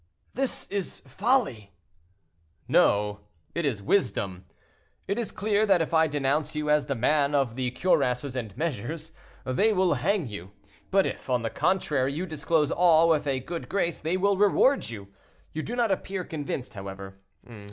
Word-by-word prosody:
"This 270 0 -2
is 200 -3 -4
folly." 140 - 0 0.9
"No, 105 0 +3 0.3
it 170 -3 0
is 110 -7 -2
wisdom. 100 - 0 0.6
It 200 +4 -1
is 235 - -3
clear 210 0 +1
that 195 -3 +5
if 165 0 -2
I 160 0 +5
denounce 145 +1 -1
you 150 0 0
as 150 -1 +3
the 140 - -1
man 140 +4 +2
of 135 -5 +1
the 130 -1 -1
cuirasses 125 -3 +1
and 110 -6 -5
measures, 155 +1 -3 0.3
they 205 +13 +2
will 185 -3 +3
hang 175 +6 0
you; 100 -3 -8 0.4
but 195 0 +3
if, - - -5
on 125 -2 +1
the 115 - -2
contrary, 145 -8 +1
you 170 +6 -3
disclose 155 -2 0
all, 165 -2 +5
with 150 -2 +2
a 135 -2 0
good 165 +5 -6
grace, 175 -4 0
they 165 +4 -1
will 200 +1 +2
reward 210 +7 +3
you. 100 -4 -8 0.4
You 155 - -2
do 235 - -5
not 235 -4 +1
appear 190 0 -2
convinced, 145 -6 -5
however. 95 -1 -8
150 Hz, 165 wpm, -27 LUFS, 125-185 Hz, 0.9 s, that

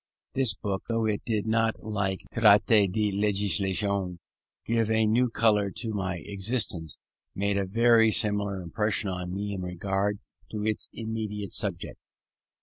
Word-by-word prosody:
This 130 -6 +3
book, 100 -2 -4
though 115 -1 0
it 105 -2 0
did 110 -3 0
not, 115 0 0
like 100 -3 -2
the 115 - -4
Traité 105 -2 +5
de 105 +1 0
Législation, 100 -2 0 0.5
give 115 -1 +1
a 110 0 +3
new 120 +4 +2
colour 105 -3 +2
to 115 -2 -3
my 95 -5 -3
existence, 100 - -1 0.4
made 100 +1 0
a 100 -1 -1
very 115 +2 +4
similar 100 -3 +2
impression 105 +3 -1
on 90 -1 -5
me 100 +2 -3
in 95 - -4
regard 95 +3 -2 0.3
to 105 -1 -4
its 110 -1 -1
immediate 110 -3 -4
subject. 95 -4 -4
105 Hz, 145 wpm, -27 LUFS, 95-110 Hz, 0.5 s, Traité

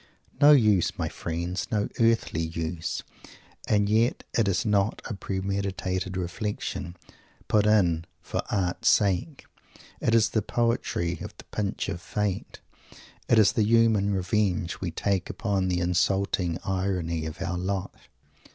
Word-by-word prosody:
No 145 +1 +9
use, 105 - +3
my - - -1
friend! 85 +3 -3
No 105 -2 +1
earthly 115 -8 +2
use! 80 0 -3 0.6
And 105 -1 +3
yet 110 +4 +2
it 115 -3 +3
is 90 -4 +1
not 105 0 +1
a - - -4
premeditated 95 -1 -3
reflection, 90 -1 -4 0.5
put 105 -1 +3
in 85 -6 +3
"for - - -3
art's 100 +4 +1
sake." 105 - +1 0.5
It 115 - +2
is 110 -1 +4
the 110 - +1
poetry 110 -7 -1
of - - -8
the - - -11
pinch 105 -1 -2
of 90 -4 -4
Fate; 100 +1 -3 0.7
it 120 - +5
is 110 -2 +6
the 110 - +1
human 110 -2 +3
revenge 95 -2 0
we 90 - -1
take 95 +2 -1
upon 100 -4 -1
the 90 -1 0
insulting 90 0 +1
irony 90 -4 -1
of 80 +4 -8
our 95 -2 -2
lot. 95 +1 -2
95 Hz, 140 wpm, -27 LUFS, 90-105 Hz, 0.7 s, No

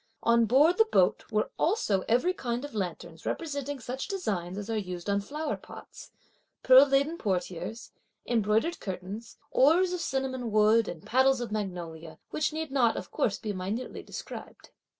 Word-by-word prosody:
On 235 0 +4
board 290 - +4
the 445 - +6
boat 185 -1 +3
were 215 0 0
also 310 - +1
every 250 +11 +3
kind 245 -4 -3
of 290 - -9
lanterns 175 -5 -5
representing 285 -3 -3
such 255 +2 -5
designs 200 - -3
as 205 0 -5
are 225 - -2
used 180 -4 -4
on 200 0 +1
flower 295 +8 -3
pots, - - -12 0.5
pearl 260 +2 +8
laden 280 +5 +1
portieres, 185 +2 -3 0.3
embroidered 225 +7 +1
curtains, 195 +4 -7
oars 345 +7 +4
of 360 - -2
cinnamon 265 -4 -2
wood, 215 +1 +4
and 160 -3 -7
paddles 265 +2 +3
of 240 -3 -4
magnolia, 175 -6 -5
which 305 - 0
need 315 -1 -4
not 240 -5 +3
of - - -6
course 200 - 0
be 215 -2 -4
minutely 200 +7 -4
described. - - -9
235 Hz, 160 wpm, -29 LUFS, 200-280 Hz, 0.5 s, pearl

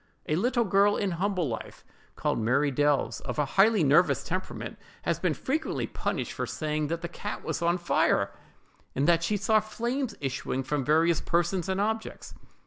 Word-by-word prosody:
A 155 - +1
little 240 +7 +2
girl, 200 0 +3
in 200 -2 0
humble 185 -1 0
life, 115 -3 -6 0.3
called - - -1
Mary 135 +6 +2
Delves, 145 +1 +1
of - - -5
a 150 - +2
highly 205 -1 +5
nervous 150 +5 +4
temperament, 185 +2 -5 0.2
has - - 0
been - - 0
frequently 310 +4 -2
punished - - -3
for - - -3
saying 155 -1 -2
that 165 +2 -3
the 170 - -3
cat 205 +5 -6
was - - -3
on 170 +1 +2
fire, 175 - +2 0.6
and 140 - +1
that 170 -1 +4
she 205 +4 +1
saw 215 +2 +3
flames 235 +4 -3
issuing 135 -1 -2
from 145 +1 -1
various 160 +4 +3
persons 175 +2 0
and 190 0 0
objects. 220 +2 -3
175 Hz, 175 wpm, -28 LUFS, 150-205 Hz, 0.6 s, highly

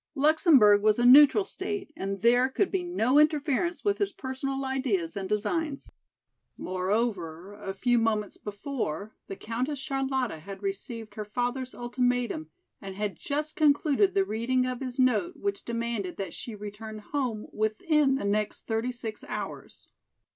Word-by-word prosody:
Luxemburg 280 - +5
was 215 0 +3
a 240 - +2
neutral 295 +10 +8
state 385 -4 -4
and 195 +1 -4
there 245 +2 +5
could 370 +8 0
be 380 - 0
no 295 -7 +2
interference 305 +3 +1
with 405 -1 +1
his 405 -1 0
personal 270 -2 -4
ideas 250 -11 -1
and 195 -1 -4
designs. 275 +8 -2 0.7
Moreover, 185 -2 -2
a 200 -2 -6
few 245 +4 +2
moments 215 -3 0
before 210 - -4
the 195 - -6
Countess 245 +8 -3
Charlotta 265 - -2
had 195 +4 -9
received 210 +2 -5
her 215 - -5
father's 245 +4 -3
ultimatum 245 -8 -1 0.3
and 195 -1 -7
had 205 -2 -2
just 300 - -3
concluded 310 +4 +3
the 390 -1 +3
reading 255 - 0
of 255 -1 -3
his 255 -1 -5
note 245 -8 +2
which 200 0 -3
demanded 230 -5 -3
that 190 -4 -4
she 230 - -6
return 210 +1 -8
home 230 -1 -3
within 270 - +2
the 270 - -3
next 210 +1 -1
thirty 225 +2 -1
six 225 -3 -6
hours. - - -7
240 Hz, 150 wpm, -28 LUFS, 205-275 Hz, 0.7 s, neutral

